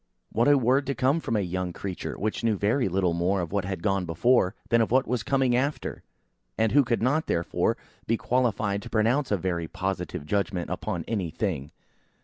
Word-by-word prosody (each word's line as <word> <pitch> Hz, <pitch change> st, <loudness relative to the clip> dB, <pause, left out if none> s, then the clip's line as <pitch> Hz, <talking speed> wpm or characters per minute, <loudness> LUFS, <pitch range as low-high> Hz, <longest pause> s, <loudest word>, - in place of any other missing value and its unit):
What 115 Hz, +3 st, +2 dB
a 145 Hz, 0 st, +6 dB
word 130 Hz, +2 st, +2 dB
to 140 Hz, -, -1 dB
come 135 Hz, +5 st, +2 dB
from 115 Hz, -, -2 dB
a 105 Hz, -, +2 dB
young 90 Hz, -1 st, -3 dB
creature, 95 Hz, 0 st, -5 dB
which 110 Hz, +3 st, -2 dB
knew 110 Hz, -3 st, +2 dB
very 105 Hz, +4 st, +1 dB
little 90 Hz, -1 st, +1 dB
more 90 Hz, +3 st, +1 dB
of 85 Hz, -2 st, -3 dB
what 100 Hz, -2 st, 0 dB
had 95 Hz, -3 st, -4 dB
gone 95 Hz, -2 st, +1 dB
before, 105 Hz, +3 st, +2 dB
than 115 Hz, -1 st, +4 dB
of 110 Hz, -, +1 dB
what 130 Hz, +2 st, +3 dB
was 120 Hz, 0 st, -1 dB
coming 130 Hz, +2 st, +2 dB
after, 140 Hz, +4 st, -1 dB, 0.6 s
and 110 Hz, -1 st, +2 dB
who 145 Hz, +2 st, +5 dB
could 120 Hz, -2 st, 0 dB
not, 145 Hz, +6 st, +1 dB
therefore, 85 Hz, -, 0 dB, 0.3 s
be 115 Hz, -, +2 dB
qualified 110 Hz, -5 st, 0 dB
to -, -, -9 dB
pronounce 120 Hz, +6 st, +2 dB
a 105 Hz, -, +2 dB
very 85 Hz, -2 st, -2 dB
positive 90 Hz, -3 st, -3 dB
judgment 95 Hz, 0 st, -1 dB
upon -, -, -3 dB
any 100 Hz, -7 st, -1 dB
thing. 80 Hz, -6 st, -3 dB
105 Hz, 200 wpm, -27 LUFS, 90-125 Hz, 0.6 s, a